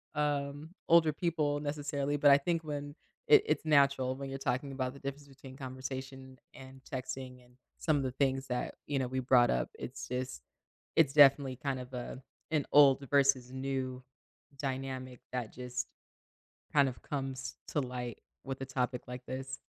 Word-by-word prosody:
um, 145 +2 -1 0.2
older 165 -2 +6
people 155 -3 0
necessarily, 145 -1 -2
but 145 0 +6
I 140 - +9
think 165 +2 0
when 145 -1 -5 0.3
it 435 -2 +8
it's - - 0
natural 140 -3 +4
when 135 0 -6
you're 135 - -4
talking 135 +1 -1
about 130 -1 -2
the 140 - -12
difference 140 +1 -6
between 135 -1 -12
conversation 130 0 -7 0.2
and 130 0 -12
texting 130 -1 -6
and 125 0 -25 0.2
some 155 -2 +2
of 140 - 0
the 130 - -1
things 135 0 0
that, 125 0 -2
you 145 - 0
know, 130 - 0
we 130 +1 -2
brought 125 -1 +5
up, 60 - 0
it's - - -6
just 125 - -4 0.5
it's 145 -4 +4
definitely 140 -3 +6
kind 135 0 -2
of 125 +1 -11
a 125 +1 -5 0.3
an 150 -3 +1
old 140 -1 +6
versus 135 -3 +4
new 130 -1 -3 0.6
dynamic 130 -2 -4
that 125 -3 -3
just 125 0 -4 0.9
kind 140 -2 +5
of 120 - -12
comes 135 -2 -4
to 150 - 0
light 125 -3 -4 0.3
with 135 0 -5
a - - -3
topic 125 -2 -1
like 125 0 -7
this. 130 0 -5
135 Hz, 170 wpm, -32 LUFS, 130-145 Hz, 0.9 s, I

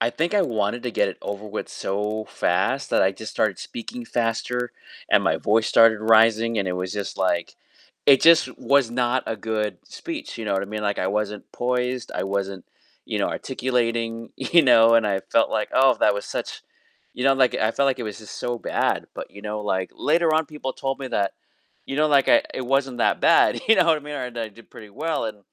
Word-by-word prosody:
I 115 - +1
think 165 +8 -2
I 200 - +4
wanted 115 - -1
to 125 - -2
get - - +1
it - - -8
over 100 +1 -5
with 105 +1 -5
so 105 +2 -3
fast 100 +11 -1
that - - +3
I 95 - +3
just 110 +2 -8
started 105 -4 0
speaking 120 +1 -8
faster, 120 +1 -2 0.4
and - - +5
my - - +2
voice 110 +1 +1
started 115 -1 +5
rising, 115 +1 +4
and 100 -2 -1
it - - -1
was 90 +1 -4
just 100 -1 -5
like, 90 -3 -1 0.5
it 135 -2 +7
just 165 -6 +5
was 140 -4 +2
not 125 +1 0
a 115 - -2
good 105 0 -3
speech. 325 - -7
You 115 - -5
know 100 - -1
what 95 - 0
I 100 - -5
mean? 105 +1 -5
Like, 100 -1 -1
I 95 - 0
wasn't 105 0 -3
poised, 125 0 -2
I - - -2
wasn't 95 -2 -3 0.4
you - - -3
know, - - +1
articulating, 115 -2 -2
you 170 - +4
know? 115 -4 +6
And 115 - +4
I 95 -1 0
felt - - +3
like - - -1
oh, 130 -1 +4
that 105 - +4
was 100 - -4
such - - -5 0.5
You 125 - -4
know, 135 0 +5
like 130 -2 +2
I 110 - +1
felt 140 - +1
like 130 -1 -1
it - - -4
was 105 -2 -6
just 110 -2 -11
so 120 0 -2
bad. - - -1
But - - -7
you 100 - -12
know 105 0 -4
like 95 -3 -2
later 165 +1 +1
on, 160 -1 +1
people 150 -3 -6
told 135 0 -3
me 135 - -5
that, 100 -5 -1 0.5
you 135 - -4
know, 155 +1 +3
like 140 -2 +3
I 295 -1 +6
it 130 - -4
wasn't 135 -2 0
that - - +1
bad - - +4
you 225 - +8
know 180 - +5
what 165 -1 +4
I - - -12
mean? 150 0 -8
Right, 125 -3 -5
that 115 - -3
I 110 - -7
did 115 +2 -18
pretty 105 -2 -12
well 155 +5 -2
and 110 -2 -5
115 Hz, 235 wpm, -23 LUFS, 105-130 Hz, 0.5 s, you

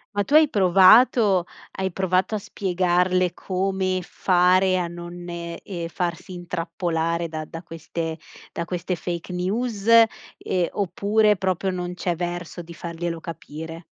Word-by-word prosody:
Ma 205 - +2
tu 275 - -5
hai 310 0 +7
provato 195 0 +5 0.3
hai 190 0 -3
provato 185 +3 0
a - - +1
spiegarle 180 -2 +1
come 190 0 -1
fare 185 +1 +3
a 175 - -1
non 175 +1 -8
e 170 0 -6
ehm, 175 -4 -5
farsi 175 +1 -4
intrappolare, 170 -1 -2
da 155 -1 -5
da 165 +1 -8
queste 165 -1 -5 0.3
da 170 - -4
queste 180 +1 -3
fake 170 0 -5
news 205 +4 -2
ehm, 225 -5 +3
oppure 205 +3 +2
proprio 190 0 -1
non 180 -1 -4
c'è 180 -1 -2
verso 175 0 -4
di 170 0 -11
farglielo 170 0 -5
capire? 160 0 -8
180 Hz, 135 wpm, -23 LUFS, 170-190 Hz, 0.3 s, hai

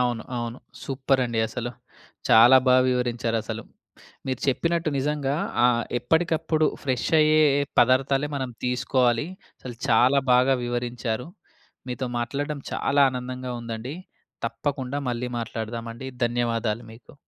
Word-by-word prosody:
అవును. 120 -2 0
అవును. 120 +1 -4 0.2
సూపరండి 130 -4 0
అసలు. 120 +1 -4 0.6
చాలా 120 +4 +8
బా 125 - +6
వివరించారసలు. 115 -3 -1 0.7
మీరు 130 - -2
చెప్పినట్టు 165 +4 +1
నిజంగా 145 0 -1 0.3
ఆహ్, 120 -1 +3 0.2
ఎప్పటికప్పుడు 160 +1 +1 0.2
ఫ్రెష్ 130 -3 -1
అయ్యే 155 0 +5 0.4
పదార్థాలే 135 +3 +3
మనం 130 -2 -3 0.2
తీసుకోవాలి. 125 0 +1 0.3
అసలు 125 -2 -8
చాలా 125 +4 +5
బాగా 130 +2 +4
వివరించారు. 120 0 -3 0.6
మీతో 125 +1 -3
మాట్లాడడం 140 +4 -3
చాలా 140 0 +1
ఆనందంగా 125 0 -5
ఉందండి. 115 +5 -6 0.5
తప్పకుండా 130 +3 -3
మళ్ళీ 125 +1 -3
మాట్లాడదామండి. 115 +2 -5 0.2
ధన్యవాదాలు 115 -1 -1
మీకు. 115 - -16
125 Hz, 110 wpm, -25 LUFS, 120-135 Hz, 0.7 s, చాలా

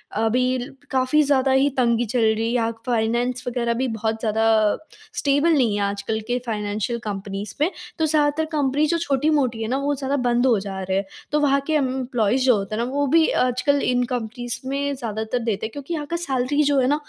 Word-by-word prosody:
अभी 250 +4 +1
ल 245 0 -6 0.2
काफ़ी 260 +3 +3
ज़्यादा 270 -2 +2
ही 265 +2 +4
तंगी 235 -1 +2
चल 245 +3 -1
रही 220 0 +2
है 230 - 0
या 230 -2 +1
फाइनेंस 240 +1 0
वगैरह 235 -1 0
भी 255 +3 -1
बहुत 220 0 -2
ज़्यादा 220 0 0 0.3
अ, - - -2 0.4
स्टेबल 285 +4 +2
नहीं 240 -8 +2
है 205 - -1
आजकल 200 +2 -2
के 245 +1 0
फाइनेंशियल 215 +1 -2
कंपनीज़ 200 0 -5
में। 310 - +4 0.3
तो 320 - +3
ज़्यादातर 300 0 +2
कंपनीज़ 295 0 +1
जो 340 - +2
छोटी-मोटी 280 -6 +1
हैं 220 - -2
ना 265 - +1
वो 285 +1 0
ज़्यादा 275 +1 -2
बंद 245 -1 +1
हो 235 -6 +4
जा 195 -1 -5
रहे 190 0 -1
हैं। 195 - -1 0.3
तो 300 - +2
वहाँ 280 -1 +3
के 315 - 0
एम्प्लॉइज़ 255 -4 +1
जो 250 -3 +5
होते 200 +1 -4
हैं 230 - -1
ना 245 - -3
वो 285 +1 +1
भी 320 +3 +4 0.2
आजकल 255 +3 +1
इन 250 0 +2
कंपनीज़ 240 0 -4
में 280 +1 -1
ज़्यादातर 220 0 -3
देते 220 -2 -1
हैं 220 - -5
क्योंकि 285 +5 -6
यहाँ 300 -2 -3
का 340 - -2
सैलरी 285 -3 0
जो 285 -1 +3
है 255 - +2
ना, 290 - +3
250 Hz, 220 wpm, -22 LUFS, 225-280 Hz, 0.4 s, जो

